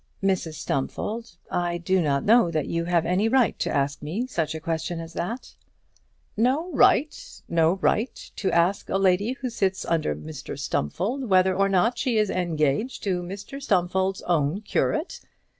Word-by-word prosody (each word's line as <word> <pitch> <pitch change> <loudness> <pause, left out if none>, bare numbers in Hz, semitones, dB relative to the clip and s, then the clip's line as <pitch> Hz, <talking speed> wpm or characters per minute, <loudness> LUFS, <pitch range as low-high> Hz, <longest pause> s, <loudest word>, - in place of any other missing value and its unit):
"Mrs 185 -5 0
Stumfold, 180 - -3
I 175 -1 0
do 185 +2 +1
not 140 -3 0
know 225 -4 +5
that 155 -3 -1
you 170 0 -2
have 170 -1 +2
any 185 +6 +2
right 250 -5 +2
to - - -1
ask 140 0 -1
me 175 - -3
such 165 - -2
a - - -4
question 160 +1 -3
as 165 0 -8
that." 230 +8 -4 0.8
"No 270 - +1
right! 295 0 +4 0.3
No 165 0 +3
right 215 +5 -1
to 195 - 0
ask 175 +4 +1
a - - +1
lady 195 +4 +2
who 260 -2 -5
sits 195 -4 -1
under 155 - 0
Mr 75 +1 -8
Stumfold 220 - -2
whether 185 0 +4
or 195 +1 +2
not 195 +6 +2
she 250 -5 +1
is 215 -2 +2
engaged 170 - 0
to 185 -3 0
Mr 200 +9 -7
Stumfold's 190 -4 0
own 165 +2 +1
curate! 310 - -1
185 Hz, 165 wpm, -25 LUFS, 165-220 Hz, 0.8 s, know